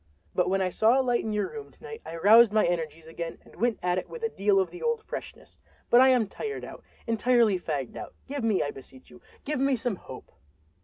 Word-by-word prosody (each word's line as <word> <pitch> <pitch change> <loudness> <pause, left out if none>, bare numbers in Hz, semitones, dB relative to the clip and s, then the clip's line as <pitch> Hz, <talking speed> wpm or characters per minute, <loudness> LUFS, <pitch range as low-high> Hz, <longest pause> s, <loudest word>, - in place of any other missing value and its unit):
But 180 0 +1
when 195 0 +1
I 185 - 0
saw 225 +8 +3
a - - +2
light 245 -2 +1
in 220 - -3
your 210 -1 -1
room 440 -2 -8
to - - -24
night 450 0 -8
I - - -8
roused 215 +6 +7
my 215 0 +3
energies 165 -2 -3
again 165 +1 -6
and - - -18
went 235 +3 +1
at 180 0 +1
it - - -10
with 480 -1 -9
a 455 - +1
deal 200 - +2
of 190 - 0
the 355 - -10
old 470 -2 -1
freshness. - - -9 0.3
But 240 - +8
I 260 - +7
am 250 -4 +4
tired 425 - -6
out—entirely 230 -3 0
fagged 145 -7 -4
out. - - -8
Give 280 -2 -5
me, 220 -4 +2
I 145 - -3
beseech 130 -1 -14
you, 120 -1 -15 0.2
give 300 -1 -2
me 275 0 +2
some 235 -4 -2
hope!" - - -11
220 Hz, 240 wpm, -27 LUFS, 180-260 Hz, 0.3 s, But